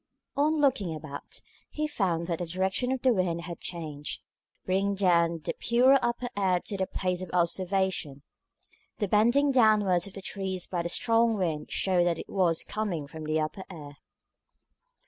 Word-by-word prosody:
On 300 +3 +2
looking 230 - +1
about, 150 -2 -8 0.3
he 305 0 -2
found 175 - -1
that 170 -1 -2
the 175 - -2
direction 190 +8 0
of 260 -1 -2
the 255 -2 +5
wind 180 -4 0
had 170 -1 -7
changed, 155 -4 -5 0.4
bringing 195 +2 +1
down 170 -4 +2
the - - -2
purer 255 +3 +4
upper 240 +1 -1
air 190 -3 +2
to 200 - -4
the 190 -1 -1
place 180 -1 -2
of 185 - -6
observation. 180 -4 0 0.7
The 205 - -1
bending 240 +8 +3
downwards 210 -7 +4
of 195 - -12
the 195 - -9
trees 190 -3 -3
by 175 -2 -2
the 170 - -3
strong 230 +4 +3
wind 160 -6 -2
showed 180 -2 +2
that 170 -2 +1
it - - -8
was 175 -4 +1
coming 195 -9 -3
from 155 +2 -9
the 155 +1 0
upper 155 +5 -3
air. 145 -5 -10
185 Hz, 170 wpm, -28 LUFS, 170-215 Hz, 0.7 s, the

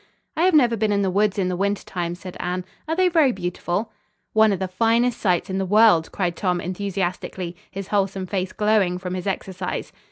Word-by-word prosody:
"I 330 - +2
have 370 -3 +4
never 245 -6 +5
been 215 -1 0
in 200 -1 +2
the 190 - +1
woods 205 +1 +2
in 190 -2 +1
the 180 - -1
winter 200 +2 -1
time," 175 -2 -3
said 180 0 -9
Anne. 180 +1 -2 0.2
"Are 320 - 0
they 370 +1 +3
very 320 -6 +4
beautiful?" 180 +2 -3 0.4
"One 220 -1 +5
of 195 - 0
the 190 - -2
finest 230 +5 +1
sights 180 -2 +1
in 190 -1 -2
the - - 0
world," 205 -4 +4
cried 175 -3 -1
Tom 180 -1 0
enthusiastically, 185 -1 -3
his 195 0 -7
wholesome 195 -2 0
face 185 0 -2
glowing 210 -4 +2
from 180 0 -5
his 185 +1 -4
exercise. 190 -1 -4
195 Hz, 210 wpm, -23 LUFS, 180-215 Hz, 0.4 s, never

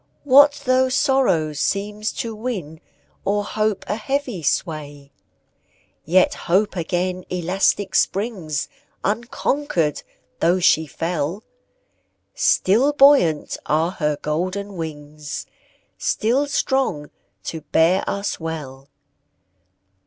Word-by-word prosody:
What 285 +1 +6
though 255 0 +3
sorrow 255 - +2
seems 205 +7 -2
to 230 -1 -4
win, 200 -9 -5 0.4
O'er 205 +1 0
hope, 215 0 -1
a - - 0
heavy 255 -4 -2
sway? 145 -3 -3 0.9
Yet 180 +4 +4 0.2
Hope 195 +3 +2
again 180 +1 -2
elastic 185 +3 0
springs, 190 -8 0 0.4
Unconquered, 220 - -1 0.4
though 175 +2 +3
she 160 -2 +3
fell; 165 +5 -3 0.9
Still 240 +10 +3
buoyant 275 - +4
are 160 +3 +1
her 150 -5 -1
golden 185 +6 -3
wings, 150 -3 -6 0.5
Still 250 +6 +1
strong 265 - -1 0.3
to 160 - -5
bear 170 +6 +2
us 200 0 -3
well. 145 -5 -6
185 Hz, 95 wpm, -21 LUFS, 155-225 Hz, 0.9 s, What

